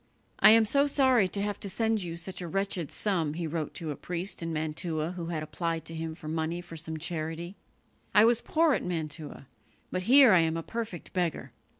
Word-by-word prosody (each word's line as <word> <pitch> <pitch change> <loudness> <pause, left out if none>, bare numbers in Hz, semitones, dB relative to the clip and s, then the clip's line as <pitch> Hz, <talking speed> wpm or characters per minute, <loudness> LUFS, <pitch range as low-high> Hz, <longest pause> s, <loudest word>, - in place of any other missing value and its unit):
"I - - +8
am 225 0 +7
so 280 +6 +3
sorry 260 -7 +4
to 200 +2 -2
have 205 -1 -3
to 200 - -3
send 225 +1 0
you 170 -2 -5
such 180 +2 -7
a 175 - -4
wretched 195 -3 -2
sum," 165 -8 -1
he 170 0 -3
wrote 160 -1 -3
to 160 -4 -4
a - - -4
priest 175 +5 -4
in 165 0 -3
Mantua 155 +1 -2
who 175 -2 -6
had 160 -3 -3
applied 165 +2 -3
to 165 - -5
him 160 0 -4
for 155 - -10
money 160 +2 -2
for 175 -1 -10
some 160 0 -4
charity; 165 +2 -4 0.6
"I 210 +1 +6
was 235 0 +3
poor 320 -1 +2
at - - -1
Mantua, 155 -4 -5 0.5
but 185 - -1
here 265 -4 +8
I 180 - +6
am 165 0 +1
a 165 - -4
perfect 225 -5 -6
beggar. 175 -4 -2
170 Hz, 215 wpm, -29 LUFS, 160-200 Hz, 0.6 s, I